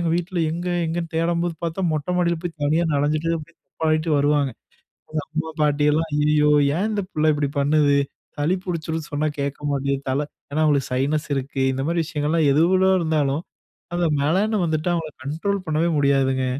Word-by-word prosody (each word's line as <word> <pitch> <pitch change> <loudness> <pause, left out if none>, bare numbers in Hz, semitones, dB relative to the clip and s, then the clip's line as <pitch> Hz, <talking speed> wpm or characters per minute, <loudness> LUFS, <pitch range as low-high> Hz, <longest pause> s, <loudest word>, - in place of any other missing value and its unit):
எங்க 170 -1 0
வீட்ல 175 +1 -3
எங்க? 175 +2 -3 0.2
எங்கேன்னு 165 0 -3
தேடம்போது 170 +1 0
பார்த்தா, 165 +3 -3
மொட்ட 150 +2 -2
மாடியில 170 -1 +2
போய் 170 -2 -5
தனியா 155 +4 +2
நஞ்சிட்டு, 150 +3 +1
அப்ப‍டியே 165 +2 -13
தப்பாடிட்டு 155 0 0
வருவாங்க. 145 -1 +2 0.8
அம்மா, 160 0 -1
பாட்டி 145 0 +2
எல்லாம், 160 +2 +1
"ஐயயோ! 150 0 +3 0.3
ஏன் 195 +5 0
இந்த 210 -2 -1
பிள்ள 155 0 +1
இப்பிடி 145 -1 0
பண்ணுது? 145 0 +3 0.4
சளி 150 +5 +2
புடிச்சிரும் 160 -3 -3
சொன்னா, 150 +1 0
கேட்க 140 0 -2
மாட்டேங்குது. 140 0 -1
தல" 135 +3 +1 0.3
ஏன்னா, 155 +2 0
அவங்களுக்கு 145 -3 +2
சைனஸ் 145 +5 0
இருக்கு. 135 0 -2
இந்த 135 0 -2
மாரி 170 0 +1
விஷயங்கள்லாம் 155 -1 0
எது, 150 +4 +4
எவ்வளோ 190 0 +4
இருந்தாலும், 155 -2 0 0.5
அந்த 175 -1 +1 0.2
மழன்னு 195 +7 +1
வந்துட்டா, 160 +2 0
அவங்கள 160 -3 -3
கண்ட்ரோல் 185 +7 -2
பண்ணவே 160 +2 +1
முடியாதுங்க. 135 -2 +2
155 Hz, 165 wpm, -22 LUFS, 145-170 Hz, 0.8 s, எது